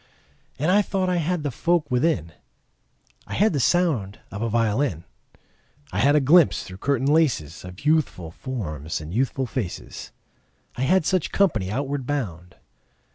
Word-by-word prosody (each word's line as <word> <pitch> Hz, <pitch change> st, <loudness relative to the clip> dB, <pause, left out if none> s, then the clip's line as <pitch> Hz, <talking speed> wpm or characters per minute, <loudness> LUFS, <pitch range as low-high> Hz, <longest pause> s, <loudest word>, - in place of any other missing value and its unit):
And 155 Hz, +6 st, +1 dB
I 205 Hz, +2 st, +5 dB
thought 190 Hz, -2 st, -1 dB
I 180 Hz, -, +1 dB
had 170 Hz, 0 st, -1 dB
the 145 Hz, -, -1 dB
folk 165 Hz, +2 st, 0 dB
within: 125 Hz, -, +1 dB, 1.0 s
I -, -, -5 dB
had 210 Hz, -1 st, +3 dB
the 145 Hz, -, 0 dB
sound 135 Hz, -, +1 dB
of 100 Hz, -, -6 dB
a 115 Hz, -, 0 dB
violin; 110 Hz, -, 0 dB, 0.9 s
I 100 Hz, -, -2 dB
had 140 Hz, +6 st, +4 dB
a -, -, +6 dB
glimpse 155 Hz, +4 st, +4 dB
through 90 Hz, -, -10 dB
curtain 135 Hz, +1 st, 0 dB
laces 140 Hz, -, +1 dB
Of 90 Hz, +6 st, -11 dB
youthful 150 Hz, -, +1 dB
forms 85 Hz, -, -5 dB
and 80 Hz, +2 st, -8 dB
youthful 130 Hz, +3 st, 0 dB
faces. 120 Hz, -, -5 dB, 0.6 s
I -, -, -5 dB
had 185 Hz, -3 st, +3 dB
such 185 Hz, -3 st, 0 dB
company 115 Hz, -, +1 dB
outward 135 Hz, +3 st, -3 dB
bound. 95 Hz, -, -4 dB
135 Hz, 155 wpm, -24 LUFS, 95-160 Hz, 1.0 s, a